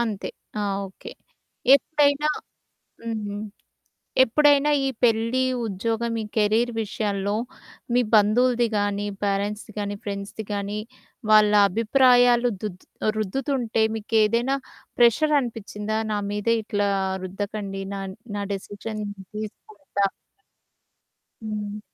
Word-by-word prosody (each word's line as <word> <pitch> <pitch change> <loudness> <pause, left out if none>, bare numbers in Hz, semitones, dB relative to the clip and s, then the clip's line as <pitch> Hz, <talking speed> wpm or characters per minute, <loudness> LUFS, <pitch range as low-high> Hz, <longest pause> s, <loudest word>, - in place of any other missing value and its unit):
అంతే. 220 -4 -2 0.3
ఆ! - - 0 0.3
ఓకే. 190 - -11 0.7
ఎప్పుడైనా 295 0 +2 0.7
హ్మ్. 210 -3 -4 0.8
ఎప్పుడైనా 290 +3 +4 0.2
ఈ - - +2
పెళ్లి, 230 +2 +3 0.3
ఉద్యోగం 225 +3 -2
ఈ - - -5
కెరీర్ 220 +3 +3
విషయంలో 205 -1 -2 0.6
మీ 245 - +5
బంధువులది 240 +3 +4
కానీ, 205 0 0 0.2
పేరెంట్స్‌ది 205 +2 -2
కాని, 205 0 -2
ఫ్రెండ్స్‌ది 200 +1 -5
కానీ 205 +1 -2 0.5
వాళ్ళ 215 -1 +6 0.2
అభిప్రాయాలు 245 +2 +4
దు 210 - -1 0.5
రుద్దుతుంటే 235 +1 -1
మీకేదైనా 225 +4 +2 0.4
ప్రెషర్ 245 +6 +4
అనిపిచ్చిందా 215 -3 -4 0.2
నా 205 - 0
మీదే 210 +3 +1
ఇట్లా 205 -2 0 0.4
రుద్దకండి. 195 0 -4
నా 195 - -4 0.4
నా 205 - -2
డెసిషన్ 205 +2 -5
నేను 200 -2 -8
తీసుకుంటా 215 - -3 1.4
హ్మ్. 210 -1 -4
215 Hz, 100 wpm, -24 LUFS, 205-240 Hz, 1.4 s, వాళ్ళ